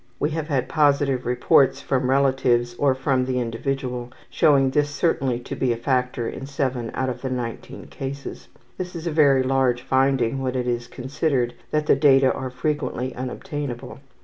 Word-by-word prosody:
We 150 - 0
have 155 -1 -3
had 135 -5 0
positive 140 -4 +2
reports 125 +2 +3
from 130 -1 -1
relatives 130 -3 +2
or 140 -2 +3
from 130 -1 0
the 130 -1 -1
individual 125 +1 -3 0.2
showing 135 -3 +4
this 145 +2 +1
certainly 135 -5 0
to - - -6
be 130 - 0
a 115 - -1
factor 125 -1 -1
in 135 - -6
7 130 -4 -2
out 130 - -1
of 125 - -5
the 130 - -3
19 120 -3 -5
cases. 140 +1 -7 0.3
This 180 -1 -5
is 165 0 -6
a 170 - -1
very 140 -4 +4
large 130 -2 +1
finding, 135 -1 +1
when 130 -1 -2
it 125 -1 -1
is 120 0 -2
considered 130 -1 -1 0.2
that 150 0 0
the - - +5
data 135 -2 +5
are 130 - -4
frequently 130 -2 -2
unobtainable. 130 -1 -5
130 Hz, 175 wpm, -23 LUFS, 125-140 Hz, 0.3 s, the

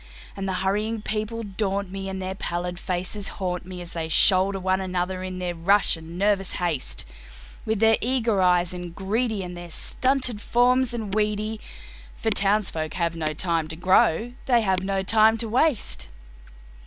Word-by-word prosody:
And 195 -1 -4
the 190 - -1
hurrying 210 +3 -1
people 220 +2 -3
daunt 200 -1 -2
me, 195 0 -5
and 190 0 -5
their 185 0 -3
pallid 175 -1 -4
faces 185 +2 -3
haunt 180 -2 -3
me 180 -1 -7
As 175 - -7
they 160 -1 -3
shoulder 190 +3 +4
one 190 +1 0
another 185 0 -2
in 185 0 -5
their 180 -1 -3
rush 195 +5 +3
and 165 +1 -10
nervous 195 -1 +1
haste, 170 -7 -1 0.6
With 220 -1 0
their 225 0 +5
eager 230 -5 +1
eyes 180 -1 +3
and 175 -1 -7
greedy, 215 +1 -1
and 180 0 -7
their 175 0 -9
stunted 255 +4 +1
forms 245 +1 +2
and 215 -4 -4
weedy, 215 +1 -1 0.5
For 225 - -1
townsfolk 195 -6 +2
have 170 -2 -1
no 155 -2 -2
time 165 -1 0
to 160 - -7
grow, 185 +5 +2
they 240 -3 +4
have 190 -3 +1
no 195 0 -1
time 220 +2 +4
to 230 - -3
waste. 255 +2 +1
195 Hz, 170 wpm, -24 LUFS, 180-215 Hz, 0.6 s, their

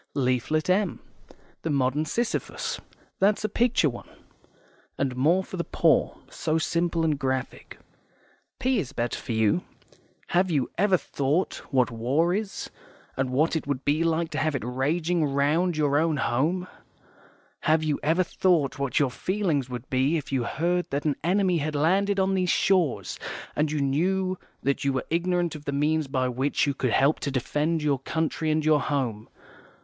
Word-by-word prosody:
Leaflet 130 +3 0
M, 190 0 +1 0.6
the 165 - -3
Modern 140 +1 +1
Sisyphus 235 +8 -2 0.4
that's 205 +2 +3
a - - +2
picture 235 -5 +2
one, 120 -4 -6 0.9
and 135 -2 -1
more 165 +9 +3
for 185 - -8
the 170 - -1
poor; - - +2
so 155 - -1
simple 170 +1 0
and 155 -3 +1
graphic. 130 -2 -3 0.8
P 260 -2 +1
is 145 -10 -4
better 120 0 -2
for 115 - -4
you. 110 +9 +2 0.7
HAVE 180 +1 +2
YOU 145 -6 0
EVER 195 -1 +4
THOUGHT 145 +4 -1
what 130 -2 +2
war 135 +10 +1
is, 205 0 -4 0.4
and 130 -1 -1
what 150 +6 +1
it 160 - -2
would 140 -2 -2
be 150 +3 +2
like 165 0 0
to - - -2
have 155 -2 0
it 125 - -3
raging 155 +7 0
round 150 +5 +1
your 145 -1 +2
own 160 -1 +1
home? 155 +9 0 0.9
HAVE 155 0 +2
YOU 150 -2 0
EVER 165 +5 +2
THOUGHT 165 -6 +1
what 140 -2 -1
your 140 -4 +3
feelings 170 -5 -1
would 125 0 -6
be 135 +5 +2
if 145 - -6
you 130 -3 0
heard 175 +7 -1
that 140 +2 -2
an 150 -2 +2
enemy 185 0 +2
had 150 +1 -2
landed 195 +7 +2
on 190 0 +2
these 185 -2 +1
shores, 165 - +1 0.4
and 150 0 +1
you 155 - -1
knew 185 +7 0 0.2
that 140 0 0
you 140 -1 +1
were 130 - -2
ignorant 175 0 +1
of 150 -2 -9
the 140 - -2
means 150 +2 +1
by 130 -1 0
which 130 +4 0
you 140 - 0
could 130 -1 -1
help 140 +6 +3
to - - -2
defend 150 +5 -1
your 145 -3 +1
country 160 +3 -2
and 155 0 +1
your 155 -2 +4
home? 120 -7 -2
155 Hz, 175 wpm, -26 LUFS, 135-175 Hz, 0.9 s, EVER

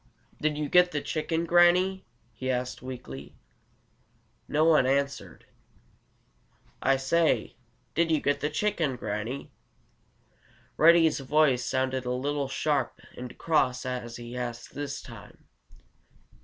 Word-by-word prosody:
"Did 150 -1 0
you 150 -1 -2
get 180 +3 +5
the 145 - -1
chicken, 160 +2 -2
Granny?" 180 +2 +4 0.3
he 130 +4 -5
asked 125 0 -2
weakly. 120 - -8 1.1
No 155 +1 +2
one 155 -5 +5
answered. 140 +1 -2 1.4
"I 135 0 +3
say, 160 +5 +1 0.4
did 170 +1 +2
you 160 -2 +3
get 145 0 0
the 150 - -1
chicken, 160 -4 0
Granny?" 115 +3 -5 1.2
Reddy's 165 -1 +5
voice 135 -2 +2
sounded 130 0 -1
a 125 - -1
little 140 +2 -1
sharp 145 0 -1 0.2
and 125 0 -8
cross 130 -7 +1
as 125 -2 -4
he 120 0 -8
asked 120 -1 -5
this 145 0 -5
time. - - -13
140 Hz, 120 wpm, -28 LUFS, 125-160 Hz, 1.4 s, get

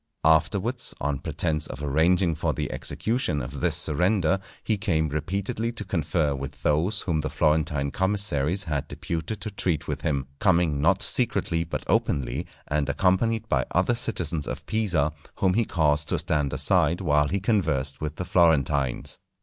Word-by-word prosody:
Afterwards, 100 +10 +2
on 70 -1 -1
pretence 75 +1 -1
of 75 - -7
arranging 80 +5 +2
for 80 -2 -1
the - - -3
execution 110 - 0
of 65 +2 -6
this - - +1
surrender, 90 +3 +2 0.2
he 110 - +1
came 80 -7 0
repeatedly 100 - -2
to 105 -2 -5
confer 80 -4 0
with 70 +1 -7
those 80 +8 +1
whom 85 -5 -1
the 75 - -3
Florentine 75 -3 +1
commissaries 95 -3 +1
had 75 -5 -3
deputed 85 +5 -4
to 110 - -4
treat 90 -5 -2
with - - -3
him, 70 -3 -1
coming 85 -7 +2
not 90 +5 +3
secretly 95 -8 +1
but 80 - -5
openly, 70 +6 0 0.2
and 75 -1 0
accompanied 95 +9 +1
by - - +1
other 120 - +2
citizens 90 - -2
of - - -5
Pisa, 90 -9 +1 0.2
whom 95 -2 +2
he 115 +3 +2
caused 75 -4 +1
to - - +1
stand 75 -3 0
aside 80 +4 +3
while 75 -5 +2
he 100 +6 -1
conversed 80 - 0
with 75 -1 -3
the 90 - -4
Florentines. 70 -7 +2
80 Hz, 160 wpm, -25 LUFS, 75-95 Hz, 0.2 s, not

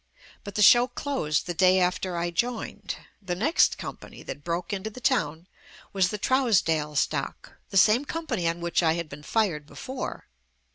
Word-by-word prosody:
But 200 -2 -8
the 210 - +3
show 240 +4 +7
closed 245 - -2
the 175 - -3
day 185 +2 +4
after 180 0 0
I 175 0 -1
joined. 235 +7 -3 0.3
The 185 -3 -3
next 280 - +3
company - - -9
that 145 - -7
broke 170 +3 -3
into 200 +2 -3
the 220 - -11
town 175 - 0 0.5
was, 190 -2 +3
"The 210 - -3
Trousdale 185 - +1
Stock," - - -2 0.2
the 195 - -1
same 225 +8 +5
com 330 +2 -4
pany 190 - 0
on 170 +1 -4
which 170 +1 +1
I 160 -2 +3
had 170 -1 -3
been 140 0 -9
fired 165 -5 0
before. 260 - -6
185 Hz, 180 wpm, -26 LUFS, 170-235 Hz, 0.5 s, show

